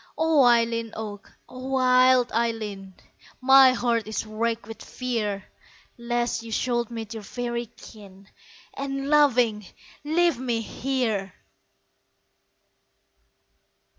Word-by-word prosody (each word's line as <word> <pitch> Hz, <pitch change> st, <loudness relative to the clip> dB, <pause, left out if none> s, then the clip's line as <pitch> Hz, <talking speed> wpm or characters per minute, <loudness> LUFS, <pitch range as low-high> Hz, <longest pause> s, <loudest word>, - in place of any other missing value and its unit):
O 320 Hz, -3 st, +3 dB
Eileen 230 Hz, -1 st, +2 dB
Og, 210 Hz, -2 st, -7 dB, 0.2 s
O 255 Hz, +1 st, -9 dB
wild 255 Hz, -1 st, +4 dB
Eileen, 215 Hz, -5 st, -3 dB, 0.4 s
My 265 Hz, 0 st, +7 dB
heart 235 Hz, -3 st, 0 dB
is 215 Hz, +1 st, -3 dB
wracked 225 Hz, 0 st, -2 dB
with 225 Hz, +1 st, -10 dB
fear 215 Hz, -6 st, -3 dB, 0.5 s
Lest 240 Hz, -1 st, -2 dB
you 230 Hz, 0 st, -10 dB
should 240 Hz, 0 st, -1 dB
meet 225 Hz, -2 st, -7 dB
your 220 Hz, -, -7 dB
faery 240 Hz, +2 st, -4 dB
kin, 200 Hz, -2 st, -14 dB, 0.5 s
And, 275 Hz, 0 st, -4 dB
laughing, 250 Hz, -8 st, +3 dB, 0.4 s
leave 320 Hz, -2 st, +1 dB
me 240 Hz, -3 st, -1 dB
here! 225 Hz, -6 st, -2 dB
235 Hz, 105 wpm, -25 LUFS, 220-255 Hz, 0.5 s, My